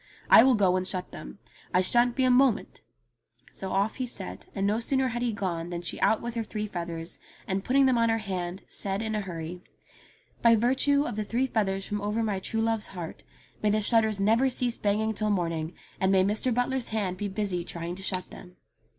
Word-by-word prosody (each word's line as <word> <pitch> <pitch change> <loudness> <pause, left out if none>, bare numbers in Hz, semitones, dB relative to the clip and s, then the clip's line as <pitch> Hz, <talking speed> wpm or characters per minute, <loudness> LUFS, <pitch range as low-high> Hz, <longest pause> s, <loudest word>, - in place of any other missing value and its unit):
I - - +10
will 260 -1 +5
go 190 -4 +3
and 185 0 -2
shut 185 -1 -3
them. - - -9 0.4
I 180 - +5
shan't 240 +5 +3
be 260 - +1
a 255 - +4
moment 250 -2 +2 0.4
!'* - - -50 0.3
So 190 -1 -5
off 200 +3 0
he 255 - -2
set, 195 -5 -6
and 195 - 0
no 210 +3 +1
sooner 265 +2 +1
had 240 0 -3
he 245 -1 +1
gone 175 -5 -3
than 175 0 -5
she - - -3
out 220 - +2
with 235 0 -4
her 230 - -2
three 215 0 -4
feathers, 170 -4 -5 0.3
and 190 0 -1
putting 270 +4 +3
them 255 -3 +3
on 230 0 +3
her 225 - +2
hand, 190 -3 -4
said 195 +2 -2
in 220 -1 -2
a 210 - 0
hurry: 175 -2 -6 0.4
" - - -30
By 230 -1 +6
virtue 265 +5 +3
of 215 - -4
the 215 - 0
three 240 +5 0
feathers 195 -6 -1
from 205 -1 -3
over 210 +3 -1
my 205 -3 -1
true 225 +3 -2
love's 225 -1 0
heart 175 -4 -7 0.4
may 210 - +2
the 215 +1 +2
shutters 220 -1 +2
never 225 +6 +3
cease 245 -1 -2
banging 215 +2 +1
till 215 0 +1
morning, 165 -4 -1 0.2
and 190 0 +2
may 190 -1 +5
Mr. 210 +6 +1
Butler's 245 +1 0
hands 200 -4 -2
be 205 - -2
busy 195 -3 -2
trying 170 0 -4
to 190 - -9
shut 185 -2 -2
them." 180 0 -12
210 Hz, 225 wpm, -27 LUFS, 185-230 Hz, 0.4 s, I